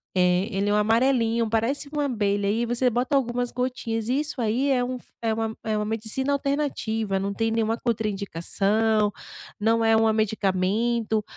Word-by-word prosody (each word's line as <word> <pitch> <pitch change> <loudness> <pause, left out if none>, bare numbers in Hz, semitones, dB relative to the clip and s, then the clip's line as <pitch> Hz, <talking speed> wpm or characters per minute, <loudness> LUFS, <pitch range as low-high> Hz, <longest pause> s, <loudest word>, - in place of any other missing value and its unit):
eh, 180 +3 +2
ele 200 +1 0
é 205 - +2
um - - +3
amarelinho, 230 +1 +2
parece 230 +6 0
uma 295 -1 0
abelha, 205 -6 0
aí 230 +3 +1
você 240 +2 +1
bota 245 +5 0
algumas 245 -2 0
gotinhas 245 -3 -2
e 265 - +2
isso 295 -3 -3
aí 235 +5 +1
é 250 -2 +2
um 250 +1 -3 0.2
é 225 -1 +1
uma 225 0 -3
é 215 -1 -1
uma 210 - -1
medicina 225 +6 -1
alternativa, 270 -8 -1
não 200 +1 -2
tem 225 +2 0
nenhuma 225 0 0
contraindicação 210 0 0 0.5
não 225 +1 +2
é 225 0 +5
um 220 0 +3
medicamento, 215 +2 0
225 Hz, 170 wpm, -25 LUFS, 210-245 Hz, 0.5 s, é